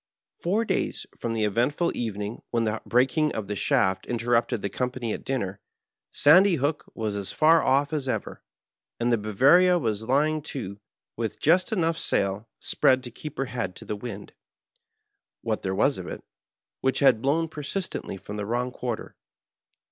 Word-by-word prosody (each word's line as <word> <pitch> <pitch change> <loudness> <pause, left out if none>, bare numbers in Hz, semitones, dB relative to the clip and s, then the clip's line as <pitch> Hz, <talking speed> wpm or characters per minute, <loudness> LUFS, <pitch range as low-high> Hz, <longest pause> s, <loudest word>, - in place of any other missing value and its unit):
Four 205 +7 +1
days - - -1
from 115 - -3
the 110 -1 0
eventful 125 - +1
evening 105 -1 -4
when 115 -1 0
the 110 0 -1
breaking 135 +5 +2
of 110 -3 -4
the 105 - -3
shaft 95 0 +1
interrupted 120 -1 0
the - - +1
company 125 0 -2
at - - -6
dinner, 100 -8 -3 0.5
Sandy 185 +6 +6
Hook 145 +1 -1
was 110 -2 -2
as 100 -1 -3
far 160 +1 +5
off 140 +3 +2
as 140 -4 -1
ever, - - -3 0.6
and 120 0 +2
the - - +4
Bamaria 145 - +5
was 110 -7 -1
lying 150 +5 +2
to, 100 -7 -5 0.4
with 115 -2 -4
just 180 +7 +3
enough 165 -5 +1
sail 100 +3 0
spread 130 -1 +2
to 120 - -7
keep 150 +5 -9
her 135 - 0
head 115 -8 -4
to - - -10
the 105 - -3
wind 105 -2 -8 0.5
— - - -57
what - - -1
there 95 0 -2
was 135 +4 +2
of 90 - -7
it - - -7 0.3
— - - -66
^which 130 0 +2
had 130 -5 +5
blown 155 +5 +1
persist 160 +5 -4
ently 95 - -5
from 105 +2 -7
the 105 - -3
wrong 120 +2 -1
quarter. 120 -3 -5
125 Hz, 180 wpm, -26 LUFS, 105-150 Hz, 0.6 s, Sandy